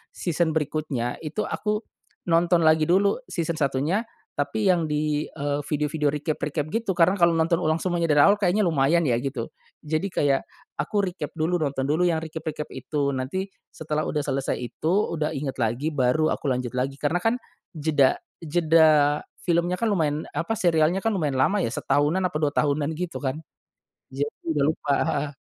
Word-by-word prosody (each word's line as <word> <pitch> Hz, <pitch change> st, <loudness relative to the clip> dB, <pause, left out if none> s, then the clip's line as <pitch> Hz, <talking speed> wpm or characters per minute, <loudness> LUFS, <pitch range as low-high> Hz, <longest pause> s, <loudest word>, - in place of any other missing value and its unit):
season 165 Hz, -2 st, 0 dB
berikutnya 145 Hz, -5 st, -2 dB
itu 160 Hz, +7 st, -3 dB
aku 210 Hz, 0 st, -2 dB, 0.5 s
nonton 170 Hz, +1 st, +3 dB
lagi 155 Hz, 0 st, +5 dB
dulu 200 Hz, -, +3 dB
season 170 Hz, -2 st, -2 dB
satunya, 150 Hz, -, 0 dB, 0.3 s
tapi 200 Hz, +8 st, 0 dB
yang 170 Hz, -3 st, +1 dB
di, 150 Hz, 0 st, 0 dB
eee, 145 Hz, -1 st, -3 dB
video-video 150 Hz, 0 st, -1 dB
recap-recap 150 Hz, 0 st, -2 dB
gitu 225 Hz, -4 st, -1 dB
karena 180 Hz, +3 st, +4 dB
kalau 170 Hz, -1 st, +5 dB
nonton 165 Hz, +1 st, +2 dB
ulang 155 Hz, -1 st, +1 dB
semuanya 175 Hz, -2 st, 0 dB
dari 145 Hz, -1 st, +5 dB
awal 200 Hz, +1 st, +5 dB
kayaknya 200 Hz, +2 st, +2 dB
lumayan 160 Hz, +1 st, +3 dB
ya 120 Hz, -4 st, +2 dB
gitu. 135 Hz, -4 st, -4 dB, 0.3 s
Jadi 155 Hz, +5 st, -1 dB
kayak 140 Hz, -2 st, +2 dB, 0.4 s
aku 205 Hz, -2 st, 0 dB
recap 185 Hz, -1 st, -4 dB
dulu 170 Hz, +2 st, 0 dB
nonton 140 Hz, -3 st, -1 dB
dulu 170 Hz, +4 st, +2 dB
yang 160 Hz, -2 st, 0 dB
recap-recap 160 Hz, -1 st, -5 dB
itu, 140 Hz, +2 st, -2 dB
nanti 165 Hz, +10 st, -3 dB, 0.2 s
setelah 155 Hz, -1 st, -3 dB
sudah 150 Hz, -1 st, -1 dB
selesai 135 Hz, -1 st, -1 dB
itu, 155 Hz, +7 st, -2 dB, 0.2 s
udah 150 Hz, 0 st, -1 dB
ingat 135 Hz, -1 st, -4 dB
lagi, 120 Hz, +7 st, 0 dB
baru 140 Hz, +3 st, +2 dB
aku -, -, -4 dB
lanjut 125 Hz, -1 st, -2 dB
lagi. 135 Hz, +2 st, -1 dB
Karena 150 Hz, +5 st, 0 dB
kan 225 Hz, +4 st, +2 dB, 0.4 s
jeda 150 Hz, -3 st, +3 dB, 0.3 s
jeda 155 Hz, -2 st, +4 dB, 0.2 s
filmnya 175 Hz, +1 st, +1 dB
kan 230 Hz, +2 st, 0 dB
lumayan, 155 Hz, -5 st, 0 dB
apa 225 Hz, -, -2 dB
serialnya 170 Hz, -3 st, +2 dB
kan 225 Hz, -, +2 dB
lumayan 155 Hz, -8 st, -1 dB
lama 195 Hz, +10 st, +3 dB
ya, -, -, 0 dB
setahunan 145 Hz, +9 st, +1 dB
apa 180 Hz, -4 st, 0 dB
2 145 Hz, -1 st, +1 dB
tahunan 145 Hz, +1 st, +1 dB
gitu 175 Hz, -1 st, -4 dB
kan. 130 Hz, -1 st, -1 dB, 0.8 s
Jadi 140 Hz, +2 st, -1 dB, 0.3 s
udah 145 Hz, -2 st, +2 dB
lupa, 150 Hz, -2 st, 0 dB
heeh. 145 Hz, 0 st, -1 dB
155 Hz, 170 wpm, -25 LUFS, 145-175 Hz, 0.8 s, lagi